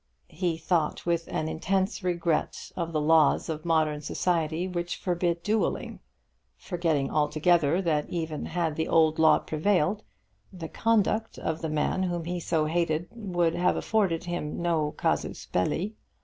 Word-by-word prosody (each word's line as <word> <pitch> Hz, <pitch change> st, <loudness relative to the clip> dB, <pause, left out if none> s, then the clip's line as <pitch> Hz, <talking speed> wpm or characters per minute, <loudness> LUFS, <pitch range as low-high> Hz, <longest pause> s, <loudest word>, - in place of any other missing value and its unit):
He 175 Hz, -2 st, -1 dB
thought 165 Hz, -1 st, 0 dB
with 170 Hz, -1 st, 0 dB
an 155 Hz, -, -2 dB
intense 190 Hz, +6 st, -1 dB
regret 170 Hz, -3 st, -1 dB
of 170 Hz, -2 st, -3 dB
the 155 Hz, -, 0 dB
laws 155 Hz, +1 st, +4 dB
of 155 Hz, 0 st, -4 dB
modern 155 Hz, -3 st, +1 dB
society 165 Hz, +1 st, -1 dB
which 175 Hz, -1 st, -3 dB
forbid 175 Hz, -1 st, -1 dB
duelling, 215 Hz, +1 st, -1 dB, 0.6 s
forgetting 165 Hz, -7 st, -1 dB
altogether 155 Hz, +3 st, +2 dB
that 155 Hz, -4 st, 0 dB
even 160 Hz, -3 st, -3 dB
had 165 Hz, -2 st, -1 dB
the 160 Hz, -, 0 dB
old 160 Hz, -1 st, +3 dB
law 160 Hz, 0 st, +6 dB
prevailed, 180 Hz, +3 st, 0 dB, 0.5 s
the 165 Hz, -4 st, -7 dB
conduct 225 Hz, 0 st, +1 dB
of 160 Hz, 0 st, -3 dB
the 160 Hz, -, -2 dB
man 155 Hz, +4 st, 0 dB
whom 175 Hz, -3 st, -2 dB
he 175 Hz, +1 st, -3 dB
so 160 Hz, -2 st, 0 dB
hated 165 Hz, 0 st, 0 dB
would 175 Hz, -7 st, 0 dB
have 180 Hz, +1 st, +2 dB
afforded 195 Hz, -7 st, 0 dB
him 175 Hz, -4 st, -4 dB
no 165 Hz, -3 st, +1 dB
casus -, -, -1 dB
belli. 175 Hz, -, -1 dB
170 Hz, 150 wpm, -27 LUFS, 155-180 Hz, 0.6 s, law